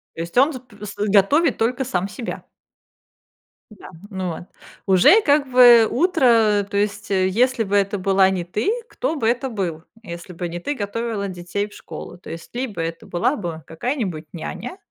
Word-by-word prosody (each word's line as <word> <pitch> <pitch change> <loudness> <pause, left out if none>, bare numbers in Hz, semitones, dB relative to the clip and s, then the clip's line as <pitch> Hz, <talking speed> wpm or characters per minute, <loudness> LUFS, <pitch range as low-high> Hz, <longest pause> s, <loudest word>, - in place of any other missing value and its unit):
То - - -5
есть, 170 +7 -6
он 280 +5 +5
с 260 - -6
п 215 -5 -13
с 205 - -8
готовит 210 - +3
только 245 +4 0
сам 190 -6 -1
себя. 230 +4 -6 1.3
Да. 215 - -13 0.2
Ну, 190 -3 -3
вот. 170 +1 -6 0.4
Уже 190 - +6
как 285 -6 +2
бы 240 -3 +8
утро, 235 - +3
то 200 - -2
есть 205 0 -2
если 220 +6 +2
бы 205 -1 -2
это 200 0 +1
была 190 0 +3
не 185 -2 -2
ты, 210 - -1 0.2
кто - - -3
бы 225 - 0
это 250 +3 0
был? 175 -8 -4 0.2
Если 170 -2 -8
бы 175 0 -5
не 170 +1 -6
ты 290 +12 -3
готовила 215 -2 -3
детей 185 +3 -4
в 210 - -17
школу, - - -9
то - - -13
есть 165 +8 -9
либо 245 -6 -4
это 165 0 -5
была 180 +11 0
бы 170 - -6
какая-нибудь 185 - -3
няня, 235 - -7
205 Hz, 180 wpm, -21 LUFS, 185-245 Hz, 1.3 s, бы